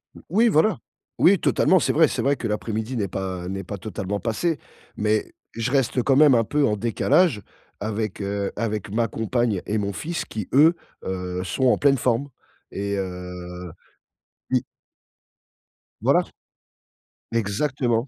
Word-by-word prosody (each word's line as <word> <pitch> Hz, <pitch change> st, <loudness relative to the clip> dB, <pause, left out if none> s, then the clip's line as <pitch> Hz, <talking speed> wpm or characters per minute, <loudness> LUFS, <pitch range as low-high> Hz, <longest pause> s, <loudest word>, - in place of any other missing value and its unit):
O -, -, -11 dB
Oui, 225 Hz, +7 st, +4 dB
voilà. 190 Hz, +4 st, +3 dB, 0.4 s
Oui, 195 Hz, +1 st, +6 dB
totalement, 185 Hz, -1 st, +3 dB
c'est -, -, +1 dB
vrai, 160 Hz, 0 st, +5 dB
c'est -, -, -2 dB
vrai 140 Hz, +1 st, +2 dB
que 115 Hz, -, -4 dB
l'après-midi 110 Hz, +3 st, -3 dB
n'est 100 Hz, -2 st, 0 dB
pas 95 Hz, -1 st, -4 dB
n'est 95 Hz, +1 st, -4 dB
pas 100 Hz, +3 st, -6 dB
totalement 100 Hz, 0 st, -4 dB
passé, 145 Hz, +8 st, -1 dB, 0.4 s
mais 105 Hz, 0 st, 0 dB, 0.2 s
je 115 Hz, +2 st, -2 dB
reste 130 Hz, -2 st, +2 dB
quand 135 Hz, +2 st, +3 dB
même 145 Hz, -2 st, +7 dB
un 115 Hz, -, +4 dB
peu 145 Hz, +5 st, +1 dB
en 105 Hz, -, +1 dB
décalage 125 Hz, -, +2 dB, 0.4 s
avec 105 Hz, -1 st, -3 dB
heu, 100 Hz, 0 st, -2 dB
avec 110 Hz, -4 st, -2 dB
ma 115 Hz, +1 st, +1 dB
compagne 110 Hz, -2 st, -1 dB
et 110 Hz, -, 0 dB
mon 100 Hz, -1 st, -2 dB
fils 170 Hz, -, -4 dB
qui 105 Hz, -4 st, -5 dB
eux, 160 Hz, +5 st, +6 dB, 0.3 s
heu, 90 Hz, -1 st, -3 dB
sont 95 Hz, +9 st, -1 dB
en -, -, +4 dB
pleine 140 Hz, -1 st, +4 dB
forme. 125 Hz, +4 st, 0 dB, 0.4 s
Et 100 Hz, 0 st, -2 dB
heu 90 Hz, -2 st, -6 dB, 0.8 s
oui. -, -, +2 dB, 1.4 s
Voilà. -, -, +4 dB, 1.1 s
Exactement. 115 Hz, +3 st, 0 dB
110 Hz, 155 wpm, -24 LUFS, 100-135 Hz, 1.4 s, même